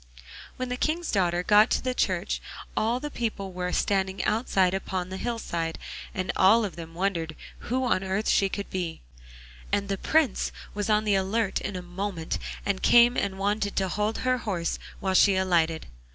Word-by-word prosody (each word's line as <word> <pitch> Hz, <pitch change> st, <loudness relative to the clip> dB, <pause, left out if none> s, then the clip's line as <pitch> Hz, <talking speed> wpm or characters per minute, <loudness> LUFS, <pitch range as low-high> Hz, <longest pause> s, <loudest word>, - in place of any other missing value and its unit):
When 255 Hz, 0 st, -3 dB
the 250 Hz, -, -2 dB
King's 325 Hz, +5 st, -1 dB
daughter 175 Hz, -3 st, +1 dB
got 210 Hz, +3 st, +6 dB
to 255 Hz, -1 st, 0 dB
church 185 Hz, -5 st, 0 dB, 0.3 s
all 230 Hz, +3 st, +1 dB
the 295 Hz, +2 st, -5 dB
people 205 Hz, -6 st, -3 dB
were 180 Hz, 0 st, -2 dB
standing 190 Hz, 0 st, 0 dB
outside 195 Hz, -5 st, +2 dB
upon 190 Hz, -1 st, -3 dB
the 190 Hz, -, -5 dB
hillside, 170 Hz, -8 st, -3 dB, 0.3 s
and 185 Hz, -2 st, -2 dB
all 215 Hz, +4 st, +5 dB
of 190 Hz, -, -6 dB
them 165 Hz, -1 st, -9 dB
wondered 170 Hz, -4 st, -1 dB, 0.3 s
who 260 Hz, +2 st, +1 dB
on 195 Hz, -6 st, +1 dB
earth 190 Hz, +3 st, -1 dB
she 195 Hz, -, +3 dB
could 200 Hz, +1 st, -5 dB
be, 175 Hz, -3 st, -3 dB, 0.7 s
and 200 Hz, 0 st, 0 dB
the 195 Hz, -1 st, -1 dB
Prince 315 Hz, -4 st, +2 dB, 0.2 s
was 205 Hz, +1 st, -2 dB
on 215 Hz, 0 st, +3 dB
the 210 Hz, -1 st, +2 dB
alert 195 Hz, +2 st, 0 dB
in 205 Hz, -, -4 dB
a 180 Hz, -, -5 dB
moment, 180 Hz, -2 st, -4 dB, 0.3 s
and 200 Hz, -2 st, -1 dB
came 240 Hz, +1 st, +6 dB
and 190 Hz, -1 st, -1 dB
wanted 200 Hz, +1 st, -1 dB
to 190 Hz, -1 st, 0 dB
hold 210 Hz, +4 st, -1 dB
her 255 Hz, 0 st, +2 dB
horse 185 Hz, -7 st, -2 dB, 0.2 s
while 190 Hz, -1 st, 0 dB
she 195 Hz, +1 st, +5 dB
alighted. 170 Hz, -4 st, +1 dB
195 Hz, 180 wpm, -27 LUFS, 185-220 Hz, 0.7 s, got